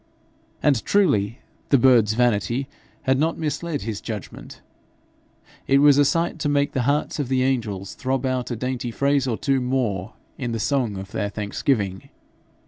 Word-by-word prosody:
And 140 -6 +3
truly 115 - +2 0.3
the 140 - +5
bird's 120 -4 +5
vanity 120 +2 +1 0.4
had 130 0 +2
not 160 +2 +1
misled 160 -1 -3
his 105 -2 -4
judgment: 105 -5 -8 1.1
it 135 - +4
was 145 0 +6
a 145 - +5
sight 165 +3 0
to 145 - 0
make 145 0 +1
the 130 - -1
hearts 150 +1 0
of 145 - -1
the 130 0 +1
angels 110 -8 -2
throb 130 0 -2
out 130 -1 -1
a 120 - -2
dainty 125 +1 -3
phrase 140 +2 +1
or 115 -3 -1
two 135 -2 +1
more 120 -6 -1 0.3
in 125 -3 -3
the 115 - -2
song 120 -5 0
of 95 0 -8
their 100 - -2
thanksgiving. 100 -1 -2
130 Hz, 165 wpm, -23 LUFS, 110-140 Hz, 1.1 s, was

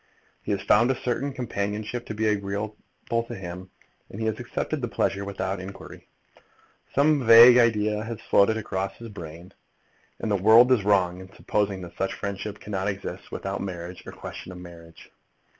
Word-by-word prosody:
He - - -4
has 100 -1 -1
found 115 +4 +4
a 130 - 0
certain 130 +3 -2
companionship 110 -1 -4
to 110 - -5
be 110 +1 -1
agreeable 100 0 -1 0.4
to 115 0 -1
him, 90 -1 -8 0.4
and 100 - -9
he 110 - -2
has 110 0 -1
accepted 135 +4 -3
the 120 - -1
pleasure 100 -3 -1
without 100 -1 -3
inquiry. 95 +1 -10 0.9
Some 145 0 +3
vague 120 +2 +9
idea 105 -2 +2
has 115 0 -6
floated 110 +2 +3
across 95 -2 -3
his 115 -1 -9
brain 85 -1 -10 0.7
that - - -5
the 105 - +2
world 110 +6 +6
is 120 -6 +4
wrong 95 -3 +2
in 95 0 -12
supposing 100 -2 -1
that 85 0 -11
such 95 - -1
friendship 100 +1 -5
cannot 95 -1 -3
exist 100 -1 -5
without 95 0 -4
marriage, 90 -2 -6
or - - -6
question - - -9
of 90 - -9
marriage. 85 -2 -13
105 Hz, 175 wpm, -25 LUFS, 95-115 Hz, 0.9 s, vague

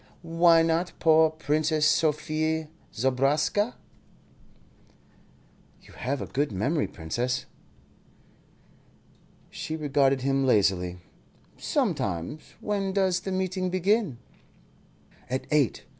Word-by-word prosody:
Why 165 0 +4
not 165 +2 0
poor 160 0 +5
Princess 155 0 0
Sophie 155 0 +1 0.2
Zobraska?" 140 - +1 2.1
"You - - -17
have 140 +3 -3
a - - -5
good 145 0 -1
memory, 135 - 0
Princess." 125 +10 -3 2.1
She 160 - -5
regarded 140 -3 +1
him 135 +1 +1
lazily. 95 -7 +2 0.6
"Sometimes. 85 - -2
When 200 -2 -1
does 190 -2 +2
the 190 - -5
meeting 185 0 -1
begin?" 185 - +1 1.1
"At 130 +1 -2
eight. 145 -6 +2
155 Hz, 90 wpm, -27 LUFS, 130-170 Hz, 2.1 s, poor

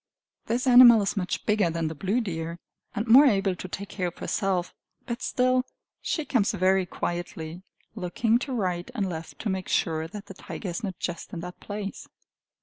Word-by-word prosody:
This 235 +3 0
animal 245 -3 +9
is 195 - -1
much 185 -3 -2
bigger 210 -4 +2
than 165 -1 -1
the 155 - -3
blue 195 +10 0
deer, 165 -5 -4 0.4
and 210 - -1
more 265 +6 +8
able 195 -5 +2
to 185 - -7
take 200 +2 -6
care 185 -4 -2
of 175 - -7
herself. 185 -3 -1 0.3
But, 235 -1 -4
still, 255 0 +2 0.4
she 315 - -2
comes 225 -8 +1
very 190 -1 +2
quietly, 175 -1 -4 0.3
looking 220 +4 +1
to 270 - -5
right 185 -5 -2
and 205 -5 0
left 165 -2 -6
to 220 - -2
make 190 -1 -3
sure 160 -1 0
that 205 +4 -9
the 195 - -10
tiger 190 +1 -7
is 175 +7 -4
not 190 -4 -4
just 175 -2 -5
in 170 - -4
that 180 +1 -8
place. 205 -1 -6
195 Hz, 190 wpm, -26 LUFS, 175-225 Hz, 0.4 s, animal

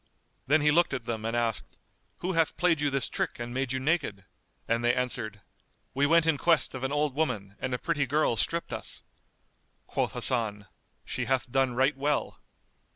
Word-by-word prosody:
Then 155 +3 +4
he 150 0 +4
looked 170 -2 +3
at 125 -4 -5
them 110 -1 -3
and 115 +1 -1
asked, 115 -2 -2 0.4
"Who 180 - -1
hath 165 -2 +1
played 165 -4 +2
you 145 - +2
this 135 -2 0
trick - - -2
and 120 0 -5
made 130 -1 -1
you 130 - 0
naked?"; 130 - -1 0.4
and 115 +1 +1
they 120 +1 +3
answered, 120 -4 -2 0.5
"We 140 +2 +2
went 165 +1 +4
in 160 -3 +2
quest 165 -3 +2
of 130 -1 -6
an 135 - -1
old 145 -1 +1
woman, 110 -10 -2
and 130 - -3
a 125 - 0
pretty 145 -2 -1
girl 145 -2 +2
stripped 170 +8 -1
us." - - -6 0.8
Quoth - - -1
Hasan, 105 -4 +1 0.4
"She 125 - -3
hath 125 -1 0
done 130 -1 +2
right 130 +3 +3
well." 145 +2 -1
130 Hz, 190 wpm, -28 LUFS, 120-150 Hz, 0.8 s, Then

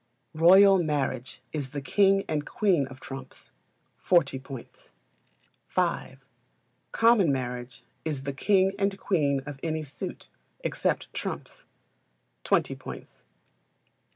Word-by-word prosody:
Royal 190 +4 +7
Marriage 140 -4 -2
is 145 -4 -3
the 145 - -4
king 195 +8 +3
and 150 -2 -1
queen 180 - +1
of 130 -1 -12
trumps 135 -2 -9 0.5
40 155 -7 +2
points. 130 -2 -11 0.9
v. - - 0 0.7
Common 225 -8 +4
Marriage 125 -1 -4 0.2
is 150 -4 -3
the 140 0 -3
king 190 +5 +3
and 195 0 0
queen 145 -9 +1
of 145 -2 -7
any 160 -1 -2
suit, 145 -1 -7 0.3
except - - -1
trumps - - -6 0.8
20 - - +2
points. - - -10
150 Hz, 110 wpm, -27 LUFS, 135-190 Hz, 0.9 s, Royal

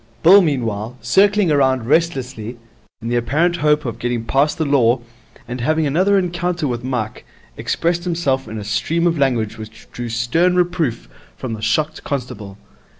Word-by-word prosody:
Bill, 190 +5 +8
meanwhile, 120 - -2
circling 200 -1 +3
round 130 -5 +2
restlessly, 130 -6 -1 0.5
in 115 - -3
the 120 - 0
apparent 155 +9 +1
hope 150 -2 +2
of 115 -1 -4
getting 120 -1 -2
past 140 +5 +1
the 160 - 0
Law 125 -4 +3 0.5
and 120 +1 -5
having 155 +5 +1
another 185 +8 +2
encounter 175 -3 -1
with 120 -2 -3
Mike, 125 -4 -3 0.3
expressed 170 +1 -1
himself 155 -7 -1
in 110 - -6
a 105 - -5
stream 155 +11 -1
of 170 -3 +1
language 115 -5 0
which 110 0 -11
drew 120 -1 -5
stern 125 +11 +1
reproof 175 - 0 0.3
from 130 -3 -5
the 110 - -6
shocked 150 +8 -1
constable. 120 -8 -5
135 Hz, 160 wpm, -19 LUFS, 115-165 Hz, 0.5 s, Bill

